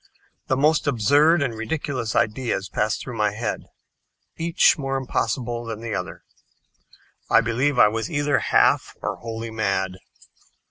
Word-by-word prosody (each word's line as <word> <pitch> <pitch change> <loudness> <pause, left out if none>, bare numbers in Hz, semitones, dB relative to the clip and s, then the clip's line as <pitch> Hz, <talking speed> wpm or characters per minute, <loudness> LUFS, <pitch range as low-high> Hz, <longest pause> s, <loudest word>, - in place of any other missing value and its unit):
The 130 - +1
most 150 +2 +2
absurd 145 +6 +4
and 125 -4 -2
ridiculous 115 0 -3
ideas 110 -3 0
passed 105 +2 -1
through 125 - -7
my 105 -2 +1
head, 110 +1 -4 0.7
each 170 +1 +3
more 135 -3 -2
impossible 120 -2 -2
than 115 -2 -6
the 115 -1 -5
other. - - -5 1.1
I - - +6
believe 125 +5 0
I - - +7
was 115 +7 -3
either 145 -4 +1
half - - +2
or - - -2
wholly 115 0 -6
mad. 95 -4 -1
120 Hz, 140 wpm, -23 LUFS, 110-145 Hz, 1.1 s, I